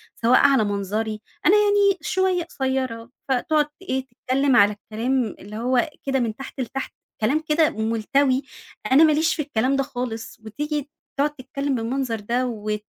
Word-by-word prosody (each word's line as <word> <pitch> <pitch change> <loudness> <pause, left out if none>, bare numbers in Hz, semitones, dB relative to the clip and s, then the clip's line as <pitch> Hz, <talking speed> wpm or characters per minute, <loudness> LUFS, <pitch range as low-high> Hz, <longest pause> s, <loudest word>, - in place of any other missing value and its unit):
سواء 235 +2 +4
على 275 -5 +5
منظري 210 +2 -2 0.2
أنا 375 - +6
يعني 410 -1 +4
شوية 375 -2 +1
قصيرة 260 -6 -3 0.2
فتقعد 295 +4 +2
ت - - -24
إيه 265 -7 -2
تتكلم 265 +2 0
على 205 -2 +6
الكلام 225 +2 -2
اللي 205 +2 -10
هو 250 +4 +1 0.2
كده 270 -1 +1
من 225 -3 -1
تحت 270 0 -9
لتحت، 265 +3 -4 0.3
كلام 265 +8 +2
كده 310 0 +4
ملتوي، 255 +5 +1 0.5
أنا 290 +5 +7
ماليش 315 +1 +3
في 305 - -1
الكلام 270 -1 0
ده 275 - +1
خالص. 245 -5 -5
وتيجي 295 +5 -3 0.3
تقعد 295 +1 +1
تتكلم 275 +1 -3
بالمنظر 235 0 -2
ده 240 +5 -1
وت 210 -2 -4
260 Hz, 155 wpm, -23 LUFS, 225-285 Hz, 0.5 s, أنا